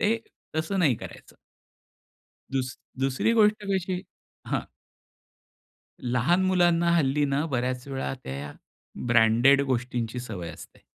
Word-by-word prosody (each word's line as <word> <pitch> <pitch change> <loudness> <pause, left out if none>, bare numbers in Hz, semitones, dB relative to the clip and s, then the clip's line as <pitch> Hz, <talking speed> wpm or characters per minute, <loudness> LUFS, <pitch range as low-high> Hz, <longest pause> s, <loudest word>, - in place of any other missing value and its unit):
ते 225 +2 +2 0.4
तसं 160 +5 -1
नाही 155 -9 +4
करायचं. - - -11 1.2
दुस 130 -1 -2 0.2
दुसरी 135 - +1
गोष्ट 215 -2 +5
कशी 185 -1 -1 0.4
हां. - - 0 1.4
लहान 125 +9 +2
मुलांना 175 -2 +3
हल्लीीना 145 -1 +1
बऱ्याच 125 -2 -2
वेळा 135 -1 -3
त्या, 70 +2 -5 0.5
ब्रँडेड 120 +4 +5
गोष्टींची 125 -2 -2
सवय 100 -9 -6
असते. - - -13
135 Hz, 105 wpm, -26 LUFS, 120-175 Hz, 1.4 s, गोष्ट